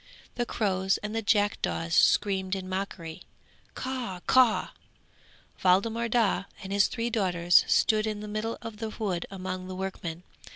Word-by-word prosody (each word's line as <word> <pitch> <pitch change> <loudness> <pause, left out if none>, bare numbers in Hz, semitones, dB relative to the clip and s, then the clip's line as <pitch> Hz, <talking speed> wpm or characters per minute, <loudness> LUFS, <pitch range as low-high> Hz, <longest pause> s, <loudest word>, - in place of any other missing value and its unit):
The 240 -1 -2
crows 190 -2 0
and 210 +1 -4
the 225 - 0
jackdaws 205 -5 0
screamed 190 +1 +3
in 190 -1 -5
mockery, 185 -3 -5 0.5
Caw! 250 -9 -4
caw! 255 -4 +4 0.9
Waldemar 225 +6 +2
Daa 220 -4 +2 0.2
and 195 +1 -5
his 200 0 +4
three 235 0 -3
daughters 180 -5 +4
stood 215 0 +3
in 215 -1 -3
the 210 - -7
middle 215 +2 -3
of 225 -2 -7
the 225 0 -4
wood 200 -6 -3
among 185 -1 -5
the 185 - -6
workmen. 185 -3 -5
200 Hz, 150 wpm, -28 LUFS, 185-225 Hz, 0.9 s, caw